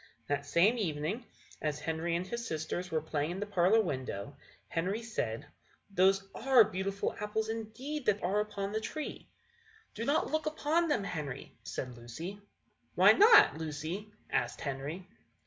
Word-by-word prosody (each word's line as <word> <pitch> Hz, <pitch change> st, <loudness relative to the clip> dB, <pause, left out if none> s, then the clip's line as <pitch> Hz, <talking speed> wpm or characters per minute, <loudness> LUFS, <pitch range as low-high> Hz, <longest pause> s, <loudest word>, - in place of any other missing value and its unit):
That 145 Hz, 0 st, -2 dB
same 205 Hz, +11 st, +4 dB
evening, 175 Hz, +6 st, -2 dB, 0.3 s
as 150 Hz, -1 st, -1 dB
Henry 165 Hz, +2 st, -1 dB
and 175 Hz, +2 st, -1 dB
his 235 Hz, +4 st, -4 dB
sisters 160 Hz, +3 st, -3 dB
were 155 Hz, -2 st, -1 dB
playing 150 Hz, -1 st, -1 dB
in 180 Hz, +2 st, -4 dB
the 205 Hz, -, -2 dB
parlour 200 Hz, +2 st, +4 dB
window, 130 Hz, -, -4 dB, 0.3 s
Henry 190 Hz, +7 st, -1 dB
said: 145 Hz, -, -3 dB, 0.5 s
"Those 195 Hz, +1 st, +3 dB
are 255 Hz, -1 st, +6 dB
beautiful 195 Hz, 0 st, -2 dB
apples 215 Hz, +1 st, -2 dB
indeed 230 Hz, +6 st, -5 dB
that 205 Hz, -1 st, +2 dB
are 190 Hz, +4 st, +2 dB
upon 205 Hz, -1 st, -2 dB
that 220 Hz, +1 st, -1 dB
tree." 305 Hz, +6 st, -5 dB, 0.6 s
"Do 225 Hz, -, -4 dB
not 285 Hz, +5 st, +1 dB
look 310 Hz, 0 st, 0 dB
upon 310 Hz, +2 st, +1 dB
them, 295 Hz, -10 st, +1 dB
Henry," 150 Hz, -8 st, -5 dB
said 125 Hz, -2 st, -5 dB
Lucy. 160 Hz, +13 st, -7 dB, 0.5 s
"Why -, -, +8 dB
not, 420 Hz, -, +7 dB
Lucy?" 160 Hz, +7 st, -4 dB, 0.2 s
asked -, -, 0 dB
Henry. 145 Hz, +6 st, -4 dB
195 Hz, 150 wpm, -32 LUFS, 155-220 Hz, 0.6 s, Why